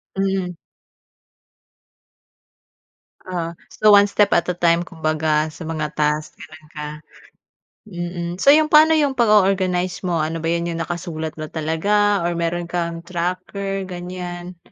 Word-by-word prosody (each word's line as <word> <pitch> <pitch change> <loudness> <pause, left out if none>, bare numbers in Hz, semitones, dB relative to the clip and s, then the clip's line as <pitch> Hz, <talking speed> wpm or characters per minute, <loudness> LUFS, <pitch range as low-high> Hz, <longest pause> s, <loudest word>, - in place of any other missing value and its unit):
Mm. 190 -2 -1 2.7
Ah, 170 -2 -4 0.2
so 215 - +3
one 205 0 +8
step 205 0 +2
at 170 - +3
a 180 - +1
time, 170 0 +2
kumbaga, 155 -2 0
sa 160 +1 -10
mga 155 -2 -3
task, 150 0 -1
gano'n 160 -1 -13
ka 150 0 -5 1.0
mm, 175 -2 -5
so - - -3
'yong 305 0 +4
paano 315 +1 +7
'yong 285 -3 +1
pag-o-organize 190 -5 +2
mo, 170 -2 0
ano 165 +1 -3
ba 165 - -3
'yan, 170 +1 0
'yong 165 0 -3
nakasulat 165 -3 -5
mo 155 0 -6
talaga 200 +5 +1
or 175 - 0
meron 170 +1 -2
kang 170 -1 -3
tracker 185 +3 -3
ganyan? 180 0 -7
175 Hz, 135 wpm, -21 LUFS, 165-195 Hz, 2.7 s, one